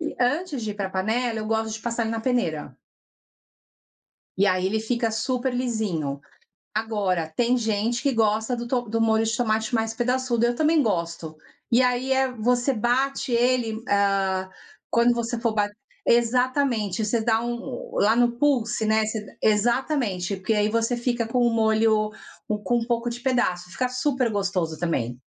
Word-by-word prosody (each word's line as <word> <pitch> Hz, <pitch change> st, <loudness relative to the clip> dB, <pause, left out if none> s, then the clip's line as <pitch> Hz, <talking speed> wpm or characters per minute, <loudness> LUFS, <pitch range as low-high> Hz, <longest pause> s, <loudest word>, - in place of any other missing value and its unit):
E 315 Hz, -, -3 dB
antes 285 Hz, +1 st, 0 dB
de 210 Hz, -1 st, -3 dB
ir -, -, -12 dB
para 195 Hz, -2 st, -3 dB
panela, 225 Hz, +5 st, -1 dB
eu 215 Hz, -, -4 dB
gosto 220 Hz, 0 st, -1 dB
de 220 Hz, -, -5 dB
passar 235 Hz, +1 st, -2 dB
ele 225 Hz, -, -2 dB
na 225 Hz, 0 st, -2 dB
peneira. 225 Hz, -, -1 dB, 1.6 s
E 200 Hz, +2 st, +3 dB
aí 185 Hz, -1 st, +2 dB
ele 215 Hz, +3 st, 0 dB
fica 230 Hz, 0 st, -1 dB
super 250 Hz, +3 st, -1 dB
lisinho. 200 Hz, -, -2 dB, 0.5 s
Agora, 200 Hz, -7 st, -1 dB
tem 245 Hz, +1 st, +3 dB
gente 225 Hz, +1 st, 0 dB
que 280 Hz, -, +2 dB
gosta 220 Hz, +2 st, +1 dB
do 235 Hz, 0 st, -5 dB
to 250 Hz, -1 st, +1 dB
do 225 Hz, +1 st, -1 dB
molho 225 Hz, 0 st, +3 dB
de 225 Hz, +1 st, -1 dB
tomate 220 Hz, -1 st, 0 dB
mais 225 Hz, 0 st, 0 dB
pedaçudo, 250 Hz, -1 st, 0 dB
eu 240 Hz, 0 st, +2 dB
também 310 Hz, +2 st, +3 dB
gosto. 170 Hz, -, -2 dB, 0.4 s
E 245 Hz, -, +5 dB
aí 250 Hz, +1 st, +1 dB
é 265 Hz, 0 st, +2 dB
você 245 Hz, +3 st, +1 dB
bate 260 Hz, +4 st, 0 dB
ele, 235 Hz, -2 st, +1 dB
ah, 195 Hz, -2 st, +1 dB, 0.4 s
quando 235 Hz, +1 st, +4 dB
você 235 Hz, 0 st, -2 dB
for 230 Hz, -2 st, 0 dB
bat 205 Hz, -1 st, 0 dB, 0.4 s
exatamente, 240 Hz, -3 st, +2 dB
você 225 Hz, +2 st, 0 dB
dá 225 Hz, 0 st, +2 dB
um 240 Hz, -, -5 dB
lá 215 Hz, +2 st, +4 dB
no 240 Hz, 0 st, +3 dB
pulse, 240 Hz, -6 st, +1 dB
né, 220 Hz, 0 st, +3 dB
você 220 Hz, 0 st, -3 dB
d -, -, -15 dB
exatamente, 215 Hz, -, +1 dB
porque 190 Hz, +4 st, -1 dB
aí 210 Hz, 0 st, +2 dB
você 230 Hz, +2 st, 0 dB
fica 240 Hz, -1 st, -1 dB
com 250 Hz, +2 st, -1 dB
o 240 Hz, -, +4 dB
molho 220 Hz, -1 st, +2 dB, 0.5 s
com 240 Hz, -, +2 dB
um 230 Hz, -, -3 dB
pouco 240 Hz, 0 st, -1 dB
de 235 Hz, -, -5 dB
pedaço, 185 Hz, -9 st, 0 dB
fica 255 Hz, -1 st, -1 dB
super 255 Hz, -1 st, 0 dB
gostoso 190 Hz, -6 st, -1 dB
também. 125 Hz, -8 st, -2 dB
225 Hz, 175 wpm, -24 LUFS, 210-245 Hz, 1.6 s, E